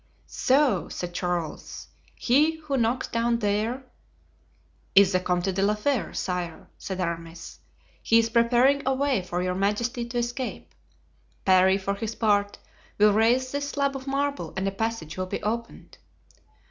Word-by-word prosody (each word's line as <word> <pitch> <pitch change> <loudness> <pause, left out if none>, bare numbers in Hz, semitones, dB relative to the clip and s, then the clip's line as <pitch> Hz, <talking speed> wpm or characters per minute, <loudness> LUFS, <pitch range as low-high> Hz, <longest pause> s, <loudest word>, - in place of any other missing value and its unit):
"So," 260 - +1
said 175 -1 -5
Charles, 175 -3 -4 0.3
"he 300 +6 +3
who 295 -3 -3
knocks 240 0 0
down 235 0 0
there——" 220 +4 -1 1.1
"Is 195 -1 +7
the 185 - +2
Comte 180 +1 -1
de 190 - -1
la 205 +2 +2
Fere, 245 +3 -1
sire," 180 -3 -4
said 190 -1 -5
Aramis. 170 -1 -5 0.4
"He 230 - +4
is 230 0 +4
preparing 245 +4 +4
a 265 - +2
way 270 -5 +1
for 180 0 -3
your 180 0 -1
majesty 210 +6 -1
to 240 +1 -5
escape. 240 +2 -4 0.7
Parry, 190 0 +5
for 200 0 -2
his 225 +2 -5
part, 205 -2 +1 0.4
will 210 0 +5
raise 240 +4 +2
this 285 0 -2
slab 280 -1 -1
of 265 0 -7
marble 280 +1 -2
and 190 +1 -1
a - - 0
passage 220 -6 -4
will 185 0 -2
be - - -5
opened." 230 +3 -5
220 Hz, 155 wpm, -26 LUFS, 190-255 Hz, 1.1 s, Is